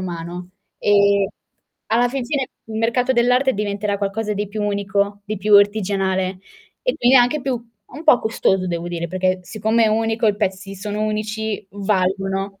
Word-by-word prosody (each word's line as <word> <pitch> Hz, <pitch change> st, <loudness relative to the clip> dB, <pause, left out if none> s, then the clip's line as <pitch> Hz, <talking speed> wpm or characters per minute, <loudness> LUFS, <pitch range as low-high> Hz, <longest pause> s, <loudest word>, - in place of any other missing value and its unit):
umano 175 Hz, 0 st, -6 dB, 0.3 s
e 200 Hz, -1 st, +3 dB, 0.6 s
alla 240 Hz, +2 st, +3 dB
fin 260 Hz, 0 st, -3 dB
fine 270 Hz, 0 st, -2 dB, 0.2 s
il 220 Hz, 0 st, -5 dB
mercato 245 Hz, +3 st, +1 dB
dell'arte 250 Hz, +2 st, +3 dB
diventerà 205 Hz, -1 st, -2 dB
qualcosa 210 Hz, +2 st, -2 dB
di 205 Hz, 0 st, -2 dB
più 210 Hz, 0 st, -4 dB
unico, 200 Hz, 0 st, -1 dB
di 215 Hz, +1 st, -4 dB
più 210 Hz, +2 st, -1 dB
artigianale 195 Hz, -2 st, +2 dB, 0.4 s
e -, -, 0 dB
quindi 250 Hz, +2 st, +5 dB
anche 250 Hz, +4 st, +4 dB
più 250 Hz, -4 st, -2 dB, 0.3 s
un 300 Hz, +5 st, -9 dB
po' 305 Hz, -6 st, +6 dB
costoso 190 Hz, -4 st, +1 dB
devo 170 Hz, -1 st, -3 dB
dire, 170 Hz, -1 st, -4 dB
perché 185 Hz, +1 st, 0 dB
siccome 220 Hz, +4 st, 0 dB
è -, -, +4 dB
unico, 225 Hz, +1 st, +1 dB
i 205 Hz, -, 0 dB
pezzi 195 Hz, -1 st, -3 dB
sono 210 Hz, +2 st, -4 dB
unici, 215 Hz, 0 st, -3 dB
valgono. 195 Hz, 0 st, -1 dB
205 Hz, 160 wpm, -20 LUFS, 195-225 Hz, 0.6 s, po